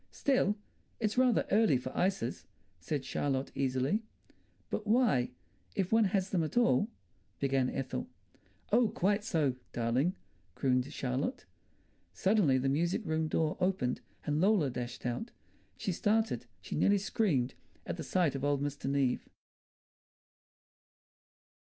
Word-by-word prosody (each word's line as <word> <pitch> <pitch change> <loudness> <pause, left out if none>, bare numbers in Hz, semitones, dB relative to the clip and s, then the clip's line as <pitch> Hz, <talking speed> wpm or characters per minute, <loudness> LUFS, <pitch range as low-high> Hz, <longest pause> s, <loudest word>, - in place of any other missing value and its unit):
"Still, 255 -7 +2 0.4
it's 215 -2 0
rather 250 -2 +3
early 205 - +5
for 130 +1 -6
ices," 185 -9 -1 0.3
said 135 - -3
Charlotte 135 -1 -1
easily. 135 - 0 0.7
"But 215 - -3
why, 220 - +3 0.5
if 185 -2 0
one 225 -1 +5
has 195 0 0
them 175 -4 +2
at 155 - -4
all...." 235 -3 +4 0.5
began 135 -2 +1
Ethel. 130 -1 -3 0.6
"Oh, 235 +2 +5
quite 205 +3 +1
so, 150 - +1 0.2
darling," 125 +10 +1 0.4
crooned 130 0 +1
Charlotte. 135 - -2 0.7
Suddenly 190 -9 +3
the 130 +1 0
music 170 - +1
room 160 -1 0
door 155 0 0
opened 180 -9 0 0.2
and 150 +1 +1
Lola 190 -8 +3
dashed 120 0 -5
out. 125 - -2 0.5
She 195 - -2
started, 205 - +1
she - - -5
nearly 200 +6 +4
screamed, 175 - +1 0.3
at - - -4
the - - -4
sight 175 -6 +1
of 135 -1 -4
old 145 -1 +2
Mr. 145 -1 -3
Neave. 135 -3 0
155 Hz, 130 wpm, -32 LUFS, 130-205 Hz, 0.7 s, early